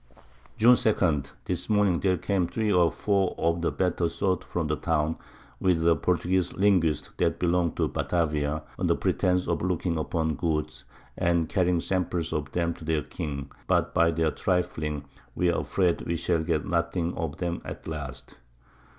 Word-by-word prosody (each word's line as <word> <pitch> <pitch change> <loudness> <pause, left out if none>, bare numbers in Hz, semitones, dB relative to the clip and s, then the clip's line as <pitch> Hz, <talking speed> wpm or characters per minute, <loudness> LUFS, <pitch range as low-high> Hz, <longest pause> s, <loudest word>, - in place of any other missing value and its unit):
June 120 +3 +7
2. 90 - +2 0.2
This - - -3
Morning 105 -5 +3
there 95 -2 +2
came 95 0 0
3 110 +1 -1
or 85 -2 +4
4 100 -3 0
of 85 +1 +1
the 85 - +1
better 90 -2 0
Sort 90 +1 -1
from 85 -2 -3
the 75 0 0
Town, 80 0 0 0.4
with 85 -3 +2
a 85 - +6
Portuguese 90 +3 0
Linguist 90 -7 +2
that - - +1
belong'd 85 -1 +1
to - - +2
Batavia, 75 -3 -1 0.2
under - - +2
Pretence 90 0 +1
of 85 -3 0
looking 90 -2 -1
upon 80 -1 -1
Goods, 80 -3 -2 0.3
and 85 -2 +1
carrying 90 -2 +2
Samples 90 -3 -1
of 75 -2 -2
'em 85 -1 +1
to 80 - -13
their 80 -2 0
King, 70 -1 -5 0.2
but - - +1
by 85 0 +4
their 80 -1 +1
Trifling, 75 -6 -1 0.3
we 90 -1 +2
are - - 0
afraid 90 -3 +1
we 85 - -2
shall 85 0 0
get 80 -2 -1
nothing 85 0 0
of 80 -3 -4
'em 85 0 -2
at - - -8
last. 70 -5 -7
85 Hz, 170 wpm, -27 LUFS, 80-90 Hz, 0.4 s, June